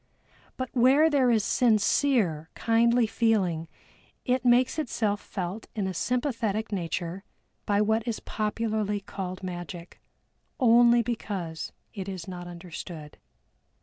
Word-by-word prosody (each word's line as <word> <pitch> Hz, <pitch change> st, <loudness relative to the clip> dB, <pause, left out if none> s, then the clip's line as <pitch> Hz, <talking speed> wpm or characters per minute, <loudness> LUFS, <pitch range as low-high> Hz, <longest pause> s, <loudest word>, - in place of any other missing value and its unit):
But 255 Hz, -1 st, -4 dB
where 270 Hz, +6 st, +5 dB
there 265 Hz, -4 st, +3 dB
is 225 Hz, -3 st, +3 dB
sincere 215 Hz, -, +2 dB
kindly 235 Hz, +1 st, +3 dB
feeling 195 Hz, -8 st, +1 dB, 0.6 s
it 255 Hz, -1 st, +1 dB
makes 250 Hz, +4 st, +3 dB
itself 215 Hz, -7 st, -1 dB
felt 190 Hz, +2 st, -5 dB
in 205 Hz, -3 st, -1 dB
a 190 Hz, -, -2 dB
sympathetic 230 Hz, -, -1 dB
nature 175 Hz, 0 st, -3 dB, 0.4 s
by 205 Hz, 0 st, +3 dB
what 220 Hz, +2 st, +1 dB
is 230 Hz, -, -2 dB
popularly 215 Hz, -1 st, -2 dB
called 185 Hz, -1 st, -6 dB
magic, 175 Hz, -1 st, -7 dB, 0.6 s
only 240 Hz, -1 st, +6 dB
because 195 Hz, -8 st, -4 dB, 0.2 s
it 195 Hz, -3 st, -5 dB
is 185 Hz, -3 st, -6 dB
not 175 Hz, -1 st, -7 dB
understood. 170 Hz, -3 st, -9 dB
215 Hz, 115 wpm, -27 LUFS, 185-235 Hz, 0.6 s, only